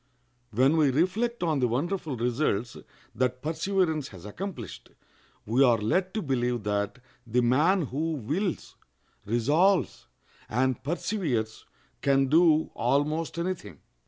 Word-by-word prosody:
When 130 +8 +3
we 150 -3 +4
reflect 185 - 0
on 160 -4 +1
the 125 - +2
wonderful 150 +3 -2
results 120 -2 -1 0.4
that 125 0 -1
perseverance 160 -2 0
has 95 -1 -12
accomplished, 130 - -7 0.6
we 120 +5 +3
are 120 -3 +5
led 180 - 0
to 215 - -1
believe 125 -5 -1
that 105 +1 -1 0.3
the 120 +2 +2
man 155 +10 +3
who 155 +4 -2
wills, 155 - -3 0.5
resolves, 150 - +2 0.4
and 130 +2 0
perseveres 145 - -2 0.3
can 135 -1 +2
do 160 0 +4
almost 155 +4 0
any 175 +2 0
thing. 185 - -13
140 Hz, 125 wpm, -27 LUFS, 120-170 Hz, 0.6 s, are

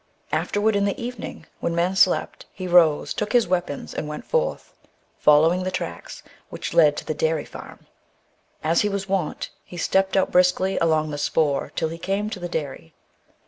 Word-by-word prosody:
Afterward 205 +1 +1
in 200 0 +2
the 200 +7 -2
evening, 235 -8 -6
when 170 - -2
men 175 +3 +1
slept, 185 -1 +2
he 185 - -6
rose, 170 -4 +4
took 210 +2 -3
his 240 -2 +4
weapons, 175 -6 -2
and 150 - -4
went 150 0 -6
forth, 485 0 -1 0.5
following 160 +5 +5
the 185 - -2
tracks - - -6 0.3
which - - -6
led 150 -3 +5
to - - -5
the - - -2
dairy 160 0 0
farm. - - -12 0.8
As 165 +5 +2
was 205 -1 -1
his 195 - -10
wont, 190 -5 -2
he 175 - -11
stepped 190 +3 +1
out 190 - +2
briskly 185 +1 +3
along 155 -2 +1
the 145 - -4
spoor 145 -1 0
till 160 - 0
he 165 +1 -7
came 200 +4 -2
to 210 - -5
the 175 0 -5
dairy. 135 - -5
175 Hz, 185 wpm, -23 LUFS, 155-195 Hz, 0.8 s, following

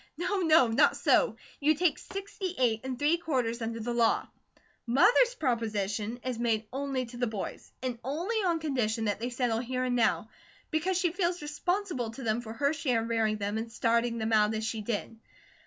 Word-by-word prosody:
"No, 365 +4 -1
no! 320 -6 +6
Not 225 - +3
so! - - +3 0.2
You 305 +2 +3
take 345 +1 +1
sixty 390 -2 -5
eight 230 -3 +2
and 260 -1 -4
three 295 +5 +3
quarters 255 -8 -1
under 230 0 -3
the 240 +2 -3
law. 235 -1 +2 0.6
Mother's 480 - +5
proposition 220 - -1
is 255 -2 -3
made 225 -2 +1
ONLY 270 -1 -2
to 240 +1 -10
the 245 0 0
boys, 215 -3 -6
and 250 -2 -3
only 335 - -2
on 360 -6 +2
condition 240 -7 -1
that 205 -1 -1
they 240 +2 -2
settle 240 -2 0
here 255 +1 -2
and 250 -1 0
now; 225 -2 +1 0.4
because 340 +4 +1
she 360 -2 +1
feels 350 -2 -1
responsible 315 - -2
to 230 +4 -8
them 225 +1 0
for 220 -2 -7
her 280 +5 +1
share 250 -7 0
in 230 - -5
rearing 220 -2 +1
them 205 +1 -2
and 225 0 -5
starting 235 +1 +1
them 225 0 -1
out 215 0 +4
as 220 0 -2
she 220 -1 -2
did. 225 +1 -4
245 Hz, 195 wpm, -29 LUFS, 225-310 Hz, 0.6 s, no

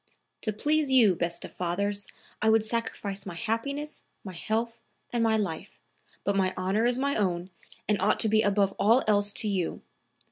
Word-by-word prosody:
"To 215 - -1
please 295 +7 +1
you, 240 -7 +6
best 170 0 -3
of - - -8
fathers, 200 +3 -2 0.3
I 220 - +3
would 220 -1 +4
sacrifice 210 -3 -3
my 175 - -6
happiness, 280 - -3 0.2
my 190 - -7
health 225 +6 -2 0.3
and 235 -1 +1
my 220 -1 +3
life; 180 -7 -4 0.4
but 200 - 0
my 190 -1 +1
honor 200 +5 +1
is 245 0 +1
my 280 +2 0
own, 185 -3 -1 0.4
and 210 -2 +1
ought 215 - +2
to - - +4
be 215 0 +4
above 200 -2 +2
all 230 +5 +4
else 205 -1 +2
to 220 - 0
you. 190 -4 -2
210 Hz, 180 wpm, -28 LUFS, 195-230 Hz, 0.4 s, you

